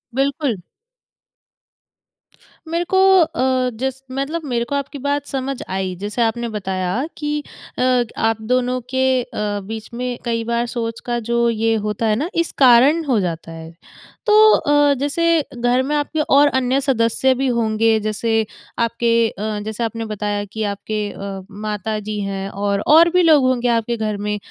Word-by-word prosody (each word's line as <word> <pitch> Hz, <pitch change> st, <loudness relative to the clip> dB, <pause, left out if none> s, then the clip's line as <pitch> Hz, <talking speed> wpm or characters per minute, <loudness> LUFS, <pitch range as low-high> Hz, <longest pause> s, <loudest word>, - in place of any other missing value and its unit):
बिल्कुल। 275 Hz, -, 0 dB, 2.1 s
मेरे 335 Hz, +2 st, -1 dB
को -, -, +5 dB, 0.2 s
अ, 260 Hz, -6 st, +1 dB
जस 265 Hz, +2 st, -3 dB
मतलब 275 Hz, +5 st, -3 dB
मेरे 240 Hz, -3 st, -1 dB
को 285 Hz, -, -3 dB
आपकी 280 Hz, +1 st, -4 dB
बात 285 Hz, +1 st, -1 dB
समझ 270 Hz, -1 st, -3 dB
आई। 190 Hz, -1 st, -2 dB
जैसे 210 Hz, +4 st, -3 dB
आपने 235 Hz, +1 st, 0 dB
बताया 190 Hz, -4 st, -3 dB, 0.2 s
कि 295 Hz, 0 st, -2 dB, 0.4 s
अ, 250 Hz, -1 st, +3 dB
आप 225 Hz, 0 st, 0 dB
दोनों 250 Hz, +2 st, 0 dB
के 260 Hz, 0 st, +2 dB
अ, -, -, -9 dB, 0.4 s
बीच 220 Hz, +2 st, -7 dB
में 245 Hz, 0 st, -3 dB
कई 230 Hz, -1 st, -1 dB
बार 235 Hz, +1 st, -1 dB
सोच 230 Hz, -1 st, -4 dB
का 240 Hz, -1 st, -1 dB
जो 235 Hz, 0 st, +2 dB
ये 225 Hz, 0 st, +1 dB
होता 210 Hz, +2 st, -2 dB
है 215 Hz, -, +2 dB
ना, 295 Hz, +10 st, -2 dB
इस 335 Hz, 0 st, 0 dB
कारण 265 Hz, +5 st, +6 dB
हो 255 Hz, -6 st, +2 dB
जाता 165 Hz, -3 st, -4 dB
है। 165 Hz, 0 st, -9 dB, 0.5 s
तो 425 Hz, -, +3 dB, 0.2 s
अ, 290 Hz, 0 st, +3 dB
जैसे, 330 Hz, +3 st, +1 dB
घर 245 Hz, +1 st, +2 dB
में 295 Hz, +3 st, -1 dB
आपके 295 Hz, +2 st, -1 dB
और 290 Hz, 0 st, +5 dB
अन्य 260 Hz, -1 st, +1 dB
सदस्य 260 Hz, 0 st, +2 dB
भी 270 Hz, +1 st, -1 dB
होंगे, 225 Hz, -2 st, +2 dB
जैसे 220 Hz, +1 st, 0 dB, 0.3 s
आपके 230 Hz, 0 st, +2 dB
अ, 210 Hz, +1 st, -4 dB
जैसे 220 Hz, +2 st, -3 dB
आपने 230 Hz, 0 st, -3 dB
बताया 205 Hz, -1 st, -3 dB
कि 215 Hz, +2 st, -5 dB
आपके 215 Hz, +1 st, -4 dB
अ, 195 Hz, -1 st, -6 dB
माता 210 Hz, +1 st, -4 dB
जी 210 Hz, 0 st, -5 dB
हैं, 195 Hz, -1 st, -4 dB
और 200 Hz, 0 st, -1 dB
और 325 Hz, +3 st, +7 dB
भी 360 Hz, +1 st, +3 dB
लोग 310 Hz, -4 st, +5 dB
होंगे 250 Hz, -1 st, +1 dB
आपके 235 Hz, +1 st, -2 dB
घर 215 Hz, -2 st, -2 dB
में। 210 Hz, +1 st, -2 dB
235 Hz, 165 wpm, -19 LUFS, 215-270 Hz, 2.1 s, और